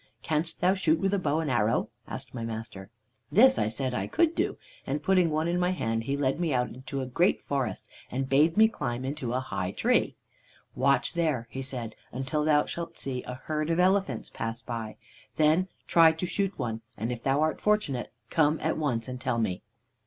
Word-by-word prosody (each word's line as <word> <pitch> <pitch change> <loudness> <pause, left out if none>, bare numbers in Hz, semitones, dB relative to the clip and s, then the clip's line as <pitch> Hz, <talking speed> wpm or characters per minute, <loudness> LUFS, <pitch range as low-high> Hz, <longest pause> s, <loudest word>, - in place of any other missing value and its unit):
"'Canst 160 +1 -1
thou 180 +2 +4
shoot 165 -5 +2
with 195 +4 0
a 200 - +2
bow 155 -2 +1
and 150 -4 -1
arrow?' 115 -2 +2 0.2
asked - - -7
my 120 -3 -4
master. 110 -4 -6 0.4
"This 260 - +6
I - - +2
said 130 +3 -2
I - - -1
could 335 0 +2
do, - - -1 0.3
and - - -2
putting 185 -3 +4
one 155 +1 0
in 175 +1 +1
my 180 0 +2
hand 115 -10 -1
he 140 +2 -1
led 135 +1 0
me 170 -3 0
out 125 0 -2
to 135 +1 -2
a - - -2
great 170 +9 +2
forest 140 -3 -2 0.2
and 130 +2 -2
bade 150 +6 +3
me 220 0 +8
climb 130 - -3
into 135 -3 -3
a 130 - +1
high 95 -8 -3
tree. 100 - +1 0.6
"'Watch 140 +2 +2
there,' 155 -9 0
he 135 - -4
said, 125 -4 -5 0.2
'until 135 +4 -1
thou 150 -1 +4
shalt 170 -1 -6
see 130 -2 -4
a 125 - -4
herd 155 0 -2
of 165 +1 +1
elephants 185 - +2
pass 115 0 -4
by. 115 -2 -5 0.4
Then 155 +4 +3 0.2
try 165 -1 +6
to 160 +3 -3
shoot 195 +2 -1
one, 110 -1 -3 0.2
and 115 +3 -2
if 120 -1 -4
thou 135 +3 +1
art 155 0 0
fortunate, 210 -13 0 0.2
come 155 -1 +3
at 160 - -1
once 120 -7 -1
and 125 0 -6
tell 125 -2 0
me.' 105 -6 -1
140 Hz, 205 wpm, -28 LUFS, 125-165 Hz, 0.6 s, me